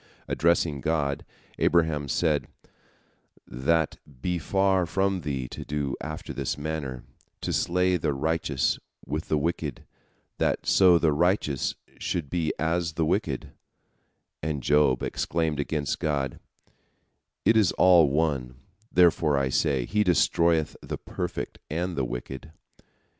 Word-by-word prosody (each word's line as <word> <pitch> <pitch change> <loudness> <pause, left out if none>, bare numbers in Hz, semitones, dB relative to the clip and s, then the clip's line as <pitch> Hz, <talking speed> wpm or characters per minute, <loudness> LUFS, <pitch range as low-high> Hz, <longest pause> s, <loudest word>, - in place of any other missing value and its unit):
Addressing 80 -3 +1
God, 70 -2 0 0.4
Abraham 80 -4 +2
said, 75 0 +1 1.0
"That 80 +5 0 0.2
be 90 +6 -1
far 95 0 +2
from 95 +1 0
Thee 70 -5 -3
to - - -7
do 70 -1 -2
after 75 0 -6
this - - -2
manner, 70 -5 -4 0.4
to - - -2
slay 90 +1 +2
the 80 -3 0
righteous 70 -1 0 0.3
with 75 +2 -4
the 75 - +1
wicked, 75 -3 -2 0.5
that - - 0
so 90 -3 +6
the 80 -2 +2
righteous 80 -4 +1 0.2
should 80 -6 -3
be 80 -3 0
as 80 +1 0
the 80 0 0
wicked," - - -1 0.9
and 75 -3 -3
Job 75 -3 +3
exclaimed 80 -3 -1
against 70 0 -1
God, 70 -4 -1 1.1
"It 110 - +5
is 105 -5 +4
all 90 -5 +6
one; 70 -4 0 0.4
therefore 85 -4 +4
I 70 -1 +1
say, 65 -2 +1
He 105 - +1
destroyeth 85 -3 +2
the - - -5
perfect - - -5
and 85 +3 -2
the 70 - 0
wicked." 60 +4 -6
80 Hz, 125 wpm, -26 LUFS, 70-85 Hz, 1.1 s, so